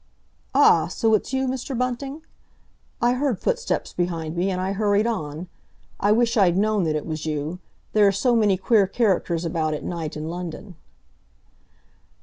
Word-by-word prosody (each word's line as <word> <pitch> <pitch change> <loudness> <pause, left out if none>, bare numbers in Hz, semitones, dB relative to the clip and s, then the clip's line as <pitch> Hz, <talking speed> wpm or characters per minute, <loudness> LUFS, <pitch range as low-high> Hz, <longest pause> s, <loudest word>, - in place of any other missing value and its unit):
"Ah! - - +5
So 225 -2 0
it's 215 - +1
you, 265 0 0
Mr. 260 0 -3
Bunting? 270 +5 -3 0.8
I 240 +1 +4
heard 255 -5 -1
footsteps - - -1
behind 165 -2 -2
me, 180 +3 0
and 185 -1 -2
I 185 +1 -1
hurried 205 +1 +1
on. 170 -7 -3 0.5
I 205 - +2
wish 230 +2 +2
I'd 185 -4 +4
known 210 -2 +2
that 155 -1 0
it 150 - -3
was 155 -1 -4
you; 155 +3 -3 0.3
there 210 -1 +5
are - - +5
so 235 +5 +1
many 210 -4 +3
queer 195 +1 +3
characters 185 -6 0
about 160 -2 -1
at - - -7
night 165 -3 -4
in 155 +1 -5
London." 180 +3 -6
195 Hz, 165 wpm, -23 LUFS, 170-235 Hz, 0.8 s, Ah